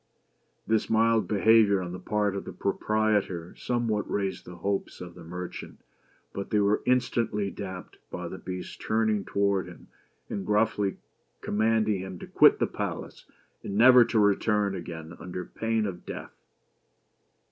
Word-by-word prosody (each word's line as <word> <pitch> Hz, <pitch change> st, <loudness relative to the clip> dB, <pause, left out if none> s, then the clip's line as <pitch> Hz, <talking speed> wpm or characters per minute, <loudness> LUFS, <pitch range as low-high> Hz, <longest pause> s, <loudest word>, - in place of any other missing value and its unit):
This 110 Hz, 0 st, +1 dB
mild 115 Hz, 0 st, +3 dB
behavior 105 Hz, -1 st, +4 dB
on 90 Hz, -1 st, -5 dB
the 90 Hz, -, -6 dB
part 105 Hz, -2 st, 0 dB
of 100 Hz, -, -4 dB
the -, -, -7 dB
proprietor 100 Hz, -4 st, 0 dB
some 120 Hz, -1 st, -1 dB
what 105 Hz, -2 st, -1 dB
raised 95 Hz, -2 st, -2 dB
the 90 Hz, -, -10 dB
hopes 100 Hz, +3 st, -3 dB
of 90 Hz, -1 st, -8 dB
the 85 Hz, 0 st, -12 dB
merchant, 90 Hz, +2 st, -7 dB, 0.5 s
but 100 Hz, -, -5 dB
they 105 Hz, -, +2 dB
were 100 Hz, +1 st, +2 dB
instantly 115 Hz, -5 st, +1 dB
damped 95 Hz, -2 st, -8 dB
by 90 Hz, -1 st, -5 dB
the 95 Hz, -, -7 dB
Beast's 90 Hz, 0 st, -6 dB
turning 110 Hz, -2 st, 0 dB
toward 100 Hz, -1 st, 0 dB
him, -, -, -13 dB, 0.4 s
and 100 Hz, -, -4 dB
gruffly 105 Hz, -2 st, +1 dB, 0.4 s
com 105 Hz, -, -3 dB
manding 110 Hz, -2 st, +2 dB
him 95 Hz, -1 st, -6 dB
to -, -, -8 dB
quit -, -, +5 dB
the -, -, +2 dB
palace, -, -, -5 dB, 0.4 s
and 100 Hz, -, -5 dB
never 125 Hz, +2 st, +8 dB
to 115 Hz, -, -1 dB
return 105 Hz, 0 st, +2 dB
again 85 Hz, -2 st, -7 dB
under 90 Hz, +1 st, -6 dB
pain 115 Hz, -1 st, -1 dB
of 90 Hz, -3 st, -5 dB
death. -, -, -8 dB
100 Hz, 160 wpm, -27 LUFS, 95-110 Hz, 0.5 s, never